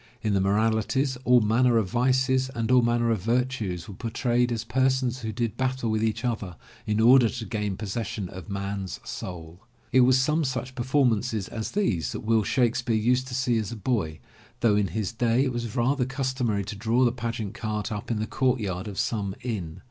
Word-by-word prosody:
In 105 - +1
the 95 - +2
moralities, 110 +6 +1
all 125 -1 +6
manner 115 +3 +3
of 110 -4 +1
Vices 130 +1 +2
and 115 0 -1
all 125 -1 +6
manner 120 0 +2
of 110 -5 0
Virtues 115 -5 -1
were 100 - -8
por 115 +4 -5
trayed 120 0 +1
as 115 -1 -2
persons 130 +1 +1
who 110 -2 -4
did 115 -1 -2
battle 130 -3 -1
with 110 0 0
each 115 +2 -1
other 105 -7 -3 0.3
in 105 0 +1
order 120 +1 +6
to 115 -1 -5
gain 105 -2 -3
possession 110 -1 -4
of 95 +2 -10
man*s 100 -1 -4
soul. 85 -1 -7 0.3
It 130 - +5
was 130 +1 +5
some 150 +4 +2
such 130 -1 -3
performances 120 -5 +1
as 110 -1 -5
these 115 - 0
that - - -5
Will 110 0 +2
Shakespeare 120 +1 +1
used 125 +4 +2
to 125 - -5
see 125 -3 +1
as 110 0 -4
a - - -5
boy, 100 -8 -1 0.4
though 110 -3 +4
in 105 -1 +2
his 95 +3 -3
day 115 +2 +2
it 130 -2 -1
was 120 -1 -4
rather 130 +1 +1
customary 130 -6 -1
to 105 +2 -6
draw 115 +5 +2
the 120 - +3
pageant 115 -4 -4
cart 105 -1 -3
up 105 +3 -5
in 115 - 0
the 105 - -1
courtyard 110 -8 -1
of 100 -2 -7
some 100 -4 -1
inn. 95 -10 -4
115 Hz, 200 wpm, -26 LUFS, 105-125 Hz, 0.4 s, all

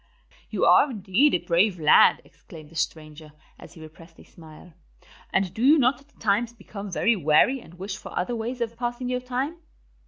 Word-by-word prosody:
"You - - 0
are 295 - +5
indeed 220 +5 +1
a - - +3
brave 175 +3 +1
lad," 150 -1 +5
exclaimed 155 -1 -15
the - - -17
stranger, 155 -2 -5 0.3
as - - -14
he 160 - -14
repressed 165 +1 -15
a - - -15
smile. 160 +1 -16 0.6
"And 190 -2 0
do 220 - -7
you 295 +4 +6
not 265 0 +1
at 290 +1 -27
times 220 +3 0
become 205 -3 -9
very 230 +6 +1
weary 170 - +3
and 175 -7 -16
wish 195 +2 -6
for - - -11
other 240 +7 -2
ways 240 +2 -5
of 230 0 -3
passing 240 +1 -4
your 250 0 -1
time?" 260 +6 -4
205 Hz, 190 wpm, -24 LUFS, 165-245 Hz, 0.6 s, you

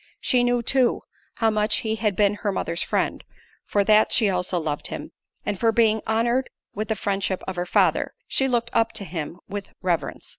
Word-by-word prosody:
She 250 -2 +2
knew, 245 -1 +1
too, 255 0 +2 0.3
how 225 -1 +2
much 210 0 +1
he 220 0 0
had 210 -3 0
been 205 +1 +3
her 205 - 0
mother's 170 -2 -2
friend; - - -1 0.4
for 205 - +2
that, 215 +1 +4
she 215 -5 +4
also 180 -1 -1
loved 155 -2 -3
him; - - -7 0.3
and 205 -2 -2
for 230 -1 +3
being 220 -1 +3
honoured 235 +4 +1 0.2
with 215 +2 -3
the 220 - 0
friendship 195 -2 -1
of 190 - -3
her 175 0 -3
father, - - +2
she 265 - +2
looked 235 -2 0
up 230 0 +2
to 200 - -3
him 165 -1 -5
with 200 0 -6
reverence. 175 -3 -1
215 Hz, 195 wpm, -24 LUFS, 190-230 Hz, 0.4 s, that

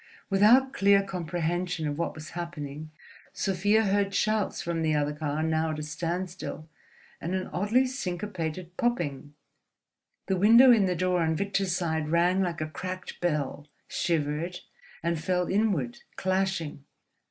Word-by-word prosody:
Without 240 +7 +5
clear 200 0 +4
comprehension 175 -2 -2
of 145 - -2
what 170 - -2
was 155 0 -9
happening, 155 -3 -6 0.4
Sofia 205 +3 +2
heard 200 -1 +1
shouts 215 -1 +1
from 170 -1 -2
the 155 -1 +1
other 150 0 0
car, 150 0 -2
now 160 0 +1
at 155 - -3
a 150 - -4
standstill, 170 +1 -4 0.5
and 175 +3 -2
an 185 - -2
oddly 220 +8 +2
syncopated 185 - -4
popping. 150 - -1 0.9
The 190 - 0
window 230 +7 +8
in 210 -5 +5
the 180 - 0
door 180 0 +1
on 160 -1 +1
Victor's 195 0 0
side 160 -4 -1
rang 175 +3 +3
like 175 -3 -2
a 155 - -1
cracked 185 +2 -6
bell, 150 -4 -1 0.2
shivered, 165 +1 -1 0.4
and 170 -1 0
fell 180 0 +1
inward, 190 - 0 0.2
clashing. 190 -6 -1
175 Hz, 140 wpm, -28 LUFS, 160-195 Hz, 0.9 s, window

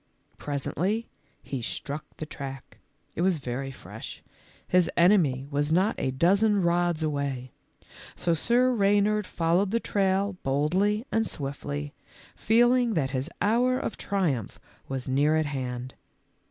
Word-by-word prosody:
Pres 140 -2 -3
ently 210 +8 -1 0.4
he 135 -3 -4
struck 145 +5 -4
the 155 - -4
track. 135 -3 -8 0.4
It - - -2
was 185 -1 +3
very 135 0 -4
fresh, 135 - -9 0.2
— - - -29
his 180 -2 +5
enemy 170 -8 +4
was 145 +1 0
not 185 +6 +3
a - - 0
dozen 200 +10 +3
rods 170 -1 +1
away; 140 -4 -2 0.6
so 170 - 0
Sir 240 +10 +3
Reynard 205 -1 +2
followed 170 +4 +1
the 230 +3 +1
trail 195 -2 0
boldly 185 - +1
and 225 0 +1
swiftly, 145 0 -4 0.4
feeling 240 +1 +3
that 135 -4 0
his 135 +3 -2
hour 245 +4 +3
of 255 - -3
triumph 160 - -2 0.3
was 135 -1 -4
near 145 +4 +3
at 155 0 +2
hand. 130 -3 -4
165 Hz, 140 wpm, -27 LUFS, 140-205 Hz, 0.6 s, his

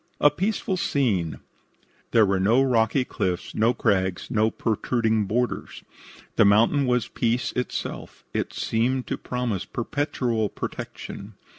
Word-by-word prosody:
A 145 - +6
PEACEFUL 190 +3 -1
SCENE 110 - 0 0.7
There 110 -2 +5
were 95 -1 +1
no 110 +7 +4
rocky 125 0 +2
cliffs, 90 -6 -2
no 115 +2 +3
crags, 95 -1 0
no 110 -2 +3
protruding 110 -1 0
boulders. 120 +3 -2 0.5
The - - +7
mountain 115 +7 +4
was 125 -3 +1
peace 120 +1 0
itself. 125 - -4
It - - -1
seemed 125 +3 0
to - - -2
promise 120 -7 -2
perpetual 120 -4 -1
protection. 100 +2 -7
115 Hz, 125 wpm, -25 LUFS, 105-125 Hz, 0.7 s, The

